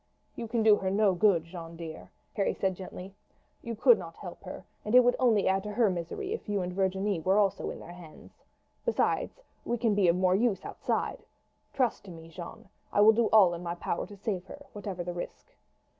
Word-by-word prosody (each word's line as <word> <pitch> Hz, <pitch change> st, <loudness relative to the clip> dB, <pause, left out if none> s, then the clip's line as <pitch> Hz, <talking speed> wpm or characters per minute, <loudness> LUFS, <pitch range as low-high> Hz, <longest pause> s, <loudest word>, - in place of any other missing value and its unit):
"You 230 Hz, -, -5 dB
can 230 Hz, 0 st, 0 dB
do 215 Hz, -1 st, +7 dB
her 190 Hz, -, -2 dB
no 200 Hz, 0 st, +3 dB
good, 180 Hz, -2 st, +3 dB
Jeanne, 165 Hz, -1 st, -9 dB
dear," 160 Hz, -1 st, -8 dB, 0.2 s
Harry 200 Hz, -, 0 dB
said 190 Hz, -1 st, -1 dB
gently. 185 Hz, +1 st, -9 dB, 0.5 s
"You 230 Hz, -1 st, -5 dB
could 445 Hz, -, +5 dB
not -, -, -9 dB
help -, -, -9 dB
her, -, -, -8 dB, 0.2 s
and 210 Hz, +3 st, 0 dB
it 250 Hz, -, +10 dB
would 245 Hz, 0 st, +3 dB
only 225 Hz, -6 st, +3 dB
add 190 Hz, 0 st, +2 dB
to 210 Hz, +1 st, -6 dB
her 225 Hz, -3 st, +3 dB
misery 185 Hz, -, -4 dB
if 460 Hz, -, -4 dB
Virginie 190 Hz, 0 st, -1 dB
and 200 Hz, -, +1 dB
you -, -, -6 dB
were 190 Hz, +5 st, +2 dB
also 200 Hz, -2 st, +1 dB
in -, -, -7 dB
their 175 Hz, -, -10 dB
hands. 170 Hz, -3 st, -15 dB, 0.4 s
Besides, -, -, 0 dB, 0.2 s
we 240 Hz, -, -1 dB
can 225 Hz, -2 st, +1 dB
be 200 Hz, -3 st, +3 dB
of 170 Hz, -, +4 dB
more 185 Hz, 0 st, +2 dB
use 210 Hz, 0 st, +1 dB
outside. -, -, -2 dB, 0.5 s
Trust 255 Hz, -4 st, 0 dB
to -, -, -10 dB
me, 165 Hz, -1 st, -11 dB
Jeanne; 170 Hz, +2 st, -10 dB, 0.2 s
I -, -, +1 dB
will 220 Hz, +2 st, +8 dB
do 230 Hz, 0 st, +2 dB
all 195 Hz, -5 st, +6 dB
in 170 Hz, -, -6 dB
my 170 Hz, -1 st, -4 dB
power 170 Hz, 0 st, -3 dB
to 205 Hz, -, -12 dB
save 195 Hz, -3 st, -3 dB
her, 285 Hz, -, -11 dB
whatever 195 Hz, -3 st, -5 dB
the 175 Hz, 0 st, -4 dB
risk." 175 Hz, -, -8 dB
195 Hz, 220 wpm, -29 LUFS, 175-220 Hz, 0.5 s, it